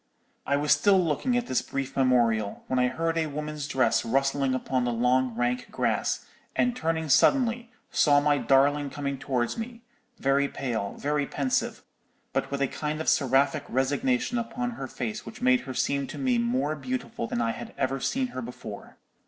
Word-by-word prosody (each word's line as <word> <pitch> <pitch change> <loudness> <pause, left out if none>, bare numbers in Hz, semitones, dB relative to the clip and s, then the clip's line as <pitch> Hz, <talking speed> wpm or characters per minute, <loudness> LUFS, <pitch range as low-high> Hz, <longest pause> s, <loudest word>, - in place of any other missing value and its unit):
'_ - - -46 0.4
"I 140 - +2
was 145 0 0
still 200 -2 +5
looking 180 - +1
at 245 - -1
this 130 - 0
brief 135 -1 -4
memorial, 120 -5 +2
when 130 - 0
I 125 - +4
heard 165 +5 -1
a 160 - 0
woman's 150 0 -4
dress 130 -7 +2
rustling 135 +2 +1
upon 130 0 -1
the 120 - 0
long 125 +1 +2
rank 120 +1 -1
grass, - - -1 0.3
and 245 0 +2
turning 160 -4 -1
suddenly, 235 - +3 0.2
saw 145 -2 +5
my 145 0 +2
darling 140 +3 +3
coming 140 -1 -4
towards 125 - -1
me, 230 +1 -7 0.3
very 140 +1 +2
pale, 115 -8 -3
very 145 0 0
pensive, 135 -3 -1 0.5
but - - -1
with 140 0 -1
a - - +2
kind 150 +3 -3
of 160 - +1
seraphic 140 +2 +2
resignation 240 - +1
upon 240 +1 -3
her 235 - -6
face 215 -1 -4
which 220 - -10
made 255 0 +4
her - - -3
seem 140 +1 0
to - - -8
me 255 -3 +1
more 235 - 0
beautiful 130 -4 -4
than - - -2
I 115 -1 +1
had - - -8
ever 135 0 0
seen 260 - -1
her 130 - -5
before. 120 -4 -9
140 Hz, 185 wpm, -27 LUFS, 130-165 Hz, 0.5 s, still